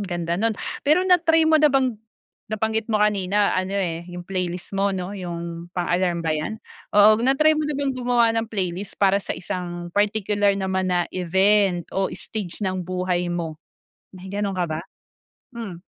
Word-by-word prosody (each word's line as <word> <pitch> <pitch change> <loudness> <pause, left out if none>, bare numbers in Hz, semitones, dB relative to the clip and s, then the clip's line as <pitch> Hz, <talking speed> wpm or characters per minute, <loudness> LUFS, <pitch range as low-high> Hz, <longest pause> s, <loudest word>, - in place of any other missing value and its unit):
ganda 175 -2 -2
nun. 225 -1 +1 0.2
Pero 310 +6 +3
na-try 330 -3 +4
mo 315 -1 +4
na 300 - +6
bang 260 -5 +1 0.5
nabanggit 220 +1 -1
mo 215 - +4
kanina 205 -1 +2
ano 185 +2 -1
eh 170 -3 -2
'yung 175 0 -8
playlist 180 -1 -4
mo 200 +1 +2
'no 185 0 -4
'yung 170 -2 -6
pang 175 -1 -1
alarm 175 -2 0
ba 160 - +1
yan? 155 +8 -3 0.4
Oo 215 +2 +7
na-try 275 +5 +4
mo 310 0 0
na 295 - -2
bang 280 -1 0
gumawa 245 -2 +2
ng 225 - -6
playlist 190 -2 -3
para 200 0 +3
sa - - -4
isang 175 -1 -5
particular 205 0 +2
naman 190 -1 -1
na 175 -1 +2
event 190 0 +2
o 195 0 0
stage 210 -2 -5
ng 185 -1 -1
buhay 180 0 -1
mo, 165 -3 -4 0.6
may 185 - -11
ganun 200 -2 -2
ka 180 - +1
ba? 155 -1 -4 0.7
Hmm. 200 -8 -7
195 Hz, 175 wpm, -23 LUFS, 175-220 Hz, 0.7 s, Oo